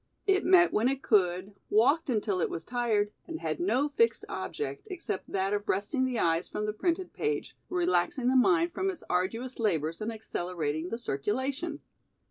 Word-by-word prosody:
It 390 -1 +3
met 355 -1 +6
when 225 +3 +3
it 275 0 -2
could, 185 -1 +2 0.2
walked 270 +9 +3
until 210 -5 0
it - - +1
was 165 - -5
tired 225 -4 +1 0.2
and 325 -2 -5
had - - -2
no 290 -5 +2
fixed 460 +11 +1
object 440 0 -5
except 340 - -5
that 195 +1 0
of 205 0 -2
resting 255 +8 +1
the 255 -2 -1
eyes 165 -3 +1
from 210 - -3
the 210 - -1
printed 345 - -1
page, 440 0 -2
relaxing 350 -8 +1
the 260 - +3
mind 340 +5 +4
from 380 +1 0
its 370 - -6
arduous 225 +9 -1
labors 165 -6 0
and 215 +2 -2
accelerating 175 -7 -3
the 230 - -3
circulation. 260 - -2
240 Hz, 175 wpm, -29 LUFS, 195-330 Hz, 0.2 s, met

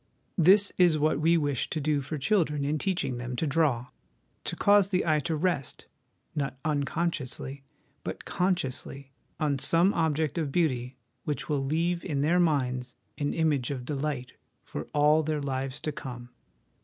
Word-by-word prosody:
This 195 +5 +6
is 175 -4 +5
what 155 -1 +2
we 165 +2 +4
wish 145 -5 -1
to 160 - -2
do 150 -1 +1
for 140 +3 -4
children 150 -3 +1
in 150 +2 0
teaching 175 -10 -1
them 125 +1 -4
to 160 - -1
draw 140 -5 +1 0.6
to - - -1
cause 205 -1 +4
the 185 -2 +1
eye 155 -2 +3
to 160 +1 -2
rest, 155 -4 -1 0.5
not 140 -4 -2
uncon 145 -2 0 0.3
sciously, 135 0 -6 0.4
but - - -6
consciously, 140 -6 -2 0.3
on 145 -3 +1
some 170 +7 +4
object 160 -1 0
of 150 -4 -2
beauty 130 -6 0 0.3
which 150 - -3
will 145 -2 0
leave 165 +5 0
in 145 -6 -1
their 165 +5 +3
minds 130 -7 0 0.2
an 145 -1 -1
image 150 -6 +1
of 130 -3 -4
delight 140 -2 -3 0.3
for - - -6
all 150 +1 +4
their 155 -1 -1
lives 135 -1 -3
to 155 - -2
come. 120 -4 -8
150 Hz, 165 wpm, -28 LUFS, 135-165 Hz, 0.6 s, This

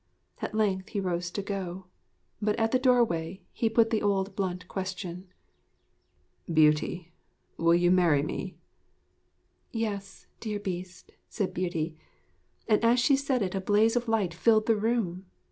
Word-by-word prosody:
At - - -4
length 200 -2 0
he 205 - -2
rose 180 -2 -2
to 200 +3 -4
go. 190 -2 -5 0.6
But 210 0 +1
at 225 0 0
the 255 - +3
doorway 210 -9 +1
he 225 - 0
put 225 0 +3
the 220 - +1
old 195 -1 0
blunt 180 -2 -3
question. 185 -1 -5 1.2
'Beauty, 155 +2 +2 0.4
will 170 0 +3
you 175 0 +3
marry 170 -6 +4
me?' 185 +4 -5 1.1
'Yes, 200 -4 -4
dear 210 -2 -3
Beast,' 180 -2 -6 0.2
said 200 -4 -2
Beauty; 165 -3 -2 0.7
and 215 0 +3
as 235 +2 +4
she 275 +3 +4
said 270 -4 0
it 185 - -3
a 195 - -2
blaze 210 +4 +3
of 240 0 0
light 210 -6 +1
filled 215 +5 +3
the 225 - +3
room. 205 -4 -1
195 Hz, 145 wpm, -28 LUFS, 180-225 Hz, 1.2 s, marry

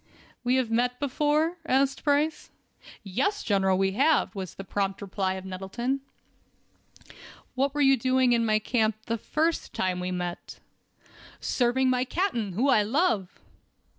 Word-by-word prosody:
"We 250 +1 +2
have 255 -3 0
met 245 +2 +1
before?" 300 +4 +1
asked 270 -2 +1
Price. 300 +1 +1 0.5
"Yes, 265 - -1
General, 190 -2 +2
we 190 0 +1
have," 280 +7 +2
was 190 -4 -6
the 195 - -7
prompt 195 0 -2
reply 190 -1 -2
of 190 0 -7
Nettleton. 195 +9 -3 1.5
"What 275 +2 0
were 295 - +1
you 270 -1 +6
doing 255 0 +2
in 230 -1 +2
my 215 -1 +3
camp 220 0 0
the 230 -1 -2
first 320 +8 -1
time 185 -1 -1
we 180 0 -3
met?" 180 -1 -5 0.8
"Serving 255 +1 +1
my 250 0 +1
captain, 250 - -1
whom 260 +9 +2
I 215 - +5
love." 215 - 0
245 Hz, 145 wpm, -27 LUFS, 195-275 Hz, 1.5 s, you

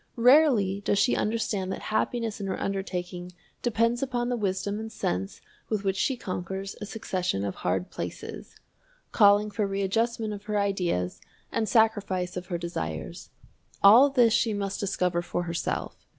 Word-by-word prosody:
Rarely 240 -6 +5
does 200 - +1
she 240 - +3
understand 210 -3 -1
that - - -4
happiness 225 -2 -1
in 195 - -3
her 190 - -3
undertaking 180 -2 -4 0.3
depends 230 0 +1
upon 245 -3 -1
the 245 - 0
wisdom 200 -1 -2
and 220 0 -6
sense 95 - -3 0.3
with 215 -2 -1
which 195 -1 0
she 255 +6 0
conquers 190 0 -5
a 210 - -5
succession 185 - -2
of 100 - -2
hard 95 - -1
places - - -7 0.6
calling 205 0 +5
for 210 -1 -1
readjustment 215 +3 -1
of 205 0 -9
her 210 -1 -1
ideas 180 - -1 0.3
and 220 -2 -1
sacrifice 205 -6 +2
of 180 0 -5
her 175 - -2
desires. 80 - -5 0.5
All 230 +8 +9
this 245 -5 +4
she 225 -2 +2
must 200 -1 -3
discover 180 -3 0
for 175 0 -3
herself. 170 -1 -4
200 Hz, 155 wpm, -27 LUFS, 180-225 Hz, 0.6 s, All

